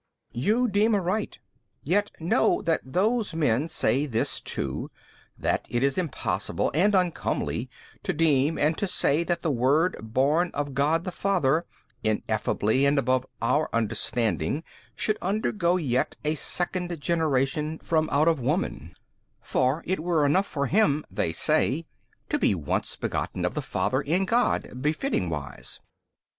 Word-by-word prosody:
B. - - -5
You 225 - +2
deem 210 +1 +3
aright: 200 +2 -1 0.5
yet 205 +2 +1
know 165 +1 +2
that 165 -1 +1
those 200 - 0
men 145 -1 +1
say 145 -2 +1
this 115 -4 0
too, - - -4 0.5
that - - -1
it 120 +2 0
is 140 -1 +2
impossible 170 -7 -1
and 195 +7 +3
uncomely 180 -3 -1 0.3
to - - -1
deem 150 -1 +2
and 155 +2 +2
to 200 - 0
say 160 -3 +2
that 175 0 -2
the 160 - +1
Word 140 +8 +2
Born 140 +10 +1
of 145 -1 -2
God 150 +5 +2
the 185 - -4
Father 170 -5 +1 0.4
Ineffably 110 +2 0
and 140 +1 +2
above 130 -1 +1 0.2
our 150 +6 +2
understanding 115 - -1 0.3
should 215 - -1
undergo 185 -2 +1
yet 130 -7 0
a 150 - +2
second 175 +2 -1
generation 150 -1 0
from 160 -1 0
out 150 +3 +3
of 165 -3 +3
woman: 150 +9 -2 0.4
for 130 +6 0
it 185 +2 -1
were 160 -2 +1
enough 185 +8 +2
for 140 -2 -2
Him 155 - +2
(they 80 - -1
say) 155 - +1 0.4
to - - 0
be - - +3
once 75 -5 -2
begotten - - -3
of - - -1
the - - -2
Father 130 +2 0
in 170 +7 +1
God 230 - 0
befitting 150 - 0
wise. 75 -4 -6
155 Hz, 150 wpm, -26 LUFS, 130-180 Hz, 0.5 s, deem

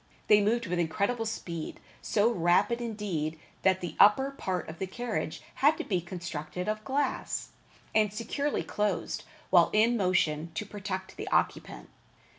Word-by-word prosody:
They 210 -1 +7
moved 230 +3 +1
with 180 -1 -1
incredible 200 +8 0
speed, 170 -7 -5 0.2
so 220 +2 +2
rapid 180 +5 +2
indeed, 195 -9 -3 0.2
that 190 -1 +3
the 175 -3 -5
upper 265 +7 +6
part 185 - -3
of 160 +1 -8
the 190 - -2
carriage 215 -7 -3 0.2
had 300 +3 +5
to - - -3
be 185 -4 0
constructed 175 0 -5
of 215 0 -2
glass, 280 +3 -1 0.4
and 215 -2 +3
securely 260 +7 -2
closed 210 0 -2 0.3
while - - +6
in 225 +3 +4
motion, 170 -5 +1
to 210 - -2
protect 190 -2 -5
the - - -5
occupant. - - -1
205 Hz, 150 wpm, -29 LUFS, 175-225 Hz, 0.4 s, They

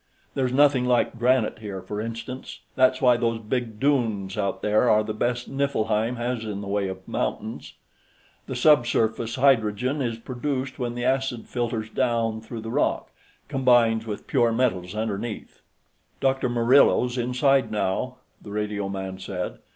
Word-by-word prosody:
There's 130 -2 0
nothing 135 -1 +4
like 120 -1 +1
granite 125 -3 +2
here, 100 -3 -6
for 105 0 -4
instance. 115 +3 -7
That's 130 0 +3
why 125 -2 +6
those 115 -1 0
big 115 0 -3
dunes, 115 -9 0
out 100 -2 -2
there, 105 +3 +3
are 110 0 +4
the 110 0 -4
best 120 +3 -1
Niflheim 125 -4 0
has 120 -1 -2
in 105 -2 -4
the 100 - -7
way 100 0 0
of 95 0 -8
mountains. - - -4 0.7
The 130 - -4
subsurface 120 -4 +2
hydrogen 130 +1 +2
is 115 -3 -2
produced 130 +3 -4
when 120 -1 -2
the 120 0 -3
acid 130 -2 0
filters 115 -3 -2
down 115 -3 0
through 110 0 -7
the 115 +1 -6
rock, - - 0 0.4
combines 120 -5 +3
with 105 - -5
pure 120 -4 +2
metals 105 -6 0
underneath." 110 0 -4 0.6
"Dr. 135 -1 +1
Murillo's 120 +1 +4
inside, 130 +2 +2
now," 105 +4 -1 0.3
the - - -11
radioman 100 -2 -3
said. 95 -1 -5
120 Hz, 150 wpm, -25 LUFS, 110-130 Hz, 0.7 s, why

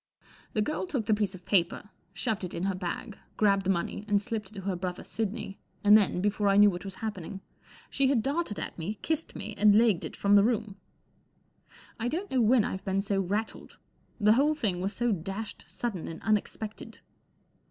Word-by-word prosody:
The 215 - +2
girl 305 - -2
took 270 -11 -2
the 215 - +3
piece 205 -2 0
of 180 - -13
paper, 190 +2 +1 0.2
shoved 220 -5 -2
it 180 - -5
in 170 - -3
her 195 0 +1
bag, 185 +3 -5 0.2
grabbed 195 -2 +3
the - - +2
money 190 +2 -1
and 205 -1 +3
slipped 210 -2 -4
it 215 - -9
to 190 0 -2
brother 180 0 -4
Sidney, 205 -1 -4 0.2
and 205 0 +8
then, 200 -4 +3
before 205 +1 +1
I 200 0 +4
knew 205 0 +7
what 175 +1 -6
was 195 -1 -7
happening, 195 -3 -5 0.5
she 275 - +2
had 260 -5 +2
darted 280 - -1
at - - -5
me, 185 +7 -3
kissed 320 -2 -2
me, 220 - -5
and 205 0 +6
legged 220 -6 +4
it - - -6
from 200 0 +3
the 200 - +7
room. 215 -3 0 1.2
I 230 - -1
don't 350 +10 -3
know 260 -2 +3
when 230 +1 +5
I've 190 -2 -4
been 195 0 0
so 195 -1 0
rattled. 205 +4 -3 0.4
The 210 0 +5
whole 290 +6 +3
thing 205 - -1
was 195 +3 -2
so 240 0 0
dashed 195 +4 -4
sudden 220 -9 -4
and 165 - -6
unexpected. 215 0 -2
205 Hz, 200 wpm, -29 LUFS, 195-225 Hz, 1.2 s, and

